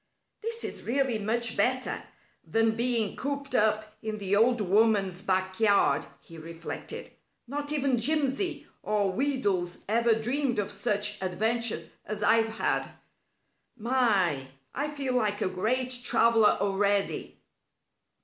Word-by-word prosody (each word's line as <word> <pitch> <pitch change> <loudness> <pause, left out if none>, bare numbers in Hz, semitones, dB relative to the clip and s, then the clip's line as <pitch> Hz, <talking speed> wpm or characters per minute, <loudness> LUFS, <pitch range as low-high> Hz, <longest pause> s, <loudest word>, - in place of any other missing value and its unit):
"This 460 +1 -3
is - - -5
really 255 -2 0
much 225 +2 +1
better 255 +5 0 0.4
than 225 0 +1
being 235 -3 +1
cooped 280 -1 -4
up 215 -1 +1
in 215 -1 -4
the 200 -1 0
old 240 +3 +3
woman's 200 -2 +2
backyard," 190 -4 +2
he 165 -1 -13
reflected. 165 +1 -7 0.3
"Not 290 +3 -5
even 275 -4 +1
Jimsy 300 - +1 0.2
or 205 -2 0
Wheedles 205 -8 -1
ever 230 +2 +3
dreamed 245 +2 0
of 205 -1 -1
such 210 -2 -1
adventures 220 +5 0
as 210 -1 -5
I've 225 +1 +2
had. - - -1 0.9
My! 210 - +1 0.3
I 285 +2 -1
feel 280 -3 -3
like 215 -4 0
a - - 0
great 245 +7 0
traveler 230 -3 +4
already." 200 0 0
225 Hz, 120 wpm, -28 LUFS, 200-255 Hz, 0.9 s, traveler